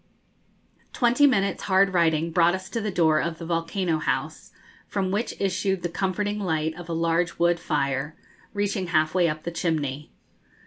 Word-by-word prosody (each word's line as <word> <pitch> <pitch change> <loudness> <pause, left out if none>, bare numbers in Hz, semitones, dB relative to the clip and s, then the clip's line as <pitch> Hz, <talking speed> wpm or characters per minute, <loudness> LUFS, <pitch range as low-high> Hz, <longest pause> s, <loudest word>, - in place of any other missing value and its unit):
Twenty 245 +4 +4
minutes' 200 -7 +1
hard 195 0 +3
riding 165 -1 +2
brought 175 +1 +4
us 190 +1 -8
to 230 - -2
the 215 - -2
door 160 -5 +3
of 170 -1 -3
the 165 - -7
'Volcano 165 0 -1
House,' - - -3 0.4
from 190 -2 -2
which 210 +5 -2
issued 195 -1 -1
the 175 - -1
comforting 205 +4 -2
light 160 -5 -1
of 175 0 -10
a - - -2
large 165 +1 0
wood 170 0 +2
fire, 145 -1 -1 0.4
reaching 205 -2 -2
halfway 170 +1 +2
up 155 0 -5
the 170 - -4
chimney. 150 -4 -2
175 Hz, 165 wpm, -25 LUFS, 160-195 Hz, 0.4 s, Twenty